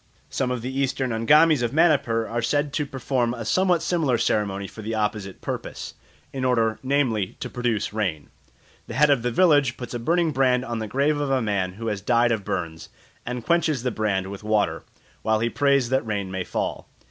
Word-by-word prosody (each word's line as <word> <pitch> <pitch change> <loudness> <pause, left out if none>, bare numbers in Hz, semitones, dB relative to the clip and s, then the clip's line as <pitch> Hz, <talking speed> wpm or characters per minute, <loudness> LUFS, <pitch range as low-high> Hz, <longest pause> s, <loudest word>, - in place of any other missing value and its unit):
Some 130 - -1
of 125 -2 -3
the 130 +1 -4
Eastern 130 -1 0
Angamis 150 +6 +5
of 120 +1 -1
Manipur 140 -8 +2
are 120 +1 -2
said 145 +4 0
to 150 -2 -1
perform 125 -2 -1
a 115 -2 -6
some 185 - +2
what 175 -3 +2
similar 155 -9 +1
ceremony 100 -3 0
for 110 - -10
the 110 +1 -3
opposite 105 -3 -3
purpose, - - -5 0.4
in 135 -1 -3
order, 115 -3 +1
namely, 130 -8 0
to - - -5
produce 120 -5 -1
rain. 95 -9 -2 0.6
The 115 - -7
head 150 +2 +5
of 135 -4 +3
the 120 - 0
village 145 -3 +3
puts 125 -1 -7
a 120 - -3
burning 165 +6 +1
brand 130 -2 +2
on 120 -3 -3
the 110 - -4
grave 140 +6 +1
of 145 -1 -1
a 135 -1 +2
man 100 -5 -1
who 115 +4 -8
has 105 -3 -2
died 120 +3 +3
of 110 -3 -1
burns, 80 -3 -4 0.4
and 125 -1 -4
quenches 160 -6 +1
the 125 - 0
brand 100 -3 -1
with 100 +1 -8
water, 105 -1 +1 0.4
while 110 0 +1
he 115 +1 0
prays 140 -4 +2
that 130 +1 +1
rain 100 -4 -3
may 95 -1 -3
fall. - - -3
120 Hz, 205 wpm, -24 LUFS, 110-140 Hz, 0.6 s, Angamis